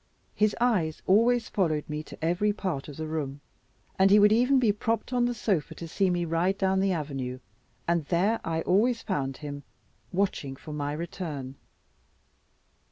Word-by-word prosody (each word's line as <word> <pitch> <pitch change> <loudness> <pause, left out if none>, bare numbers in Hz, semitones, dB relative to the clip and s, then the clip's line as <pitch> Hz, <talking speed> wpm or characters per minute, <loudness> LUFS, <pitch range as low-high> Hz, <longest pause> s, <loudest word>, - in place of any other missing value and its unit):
His 215 0 +2
eyes 195 -11 +1
always 230 +5 +4
followed 155 -6 0
me 150 0 -3
to - - -7
every 180 +5 +2
part 185 -9 -3
of 145 - -9
the 160 - -3
room, 150 -3 -3 0.6
and 190 +1 +6
he 205 - +7
would 210 0 +6
even 250 +5 +4
be 240 -5 +4
propped 225 +4 -2
on 245 -1 +3
the 245 - 0
sofa 190 -10 -1
to 170 - -7
see 190 +3 +1
me 175 -1 0
ride 170 +4 +1
down 190 0 +2
the 195 0 +2
avenue; 135 -6 -3 0.5
and 170 -1 +2
there 190 +9 +1
I 165 0 -1
always 230 +8 +2
found 135 -8 -2
him 145 -1 -6 0.5
watching 180 -8 -1
for 150 +3 -9
my 145 -1 -2
return. 155 -5 -5
175 Hz, 170 wpm, -28 LUFS, 150-210 Hz, 0.6 s, he